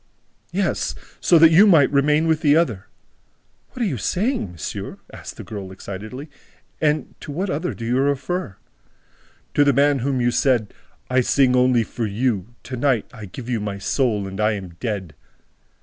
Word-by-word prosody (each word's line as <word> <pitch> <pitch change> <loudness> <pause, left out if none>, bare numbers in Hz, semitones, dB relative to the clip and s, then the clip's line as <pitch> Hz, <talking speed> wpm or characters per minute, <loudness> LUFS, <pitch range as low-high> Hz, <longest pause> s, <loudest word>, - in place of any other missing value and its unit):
"Yes, - - -1 0.2
so 175 - +5
that 165 0 +7
you 195 +6 +7
might 160 -8 +5
remain 150 +3 +3
with 160 -1 +1
the 145 -1 +4
other!" 115 - 0 0.9
"What 250 - -3
are - - +1
you 135 - -3
saying, 190 - -1
monsieur?" 85 - -6 0.2
asked - - -9
the - - -7
girl 100 -4 -7
excitedly. 105 +9 -8 0.5
"And 155 -1 0
to - - -8
what 185 +6 -2
other 165 +5 -2
do 115 - -6
you 125 +3 +1
refer?" 140 - -1 1.0
"To 145 - +4
the 140 -1 +3
man 140 +2 +3
to 125 - -4
whom 135 -2 0
you 120 0 +2
said, 120 -5 +1 0.4
'I 130 0 +4
sing 125 0 +3
only 125 -2 +4
for 115 +1 -4
you!... 110 0 -2
to 130 - -6
night 125 -4 0
I 110 -4 -9
gave 115 +6 -9
you 120 -3 -1
my 105 -1 -4
soul 105 -1 0
and 95 +2 -5
I 105 +1 +3
am 95 -3 -6
dead!'" 100 -8 -4
125 Hz, 180 wpm, -22 LUFS, 105-145 Hz, 1.0 s, that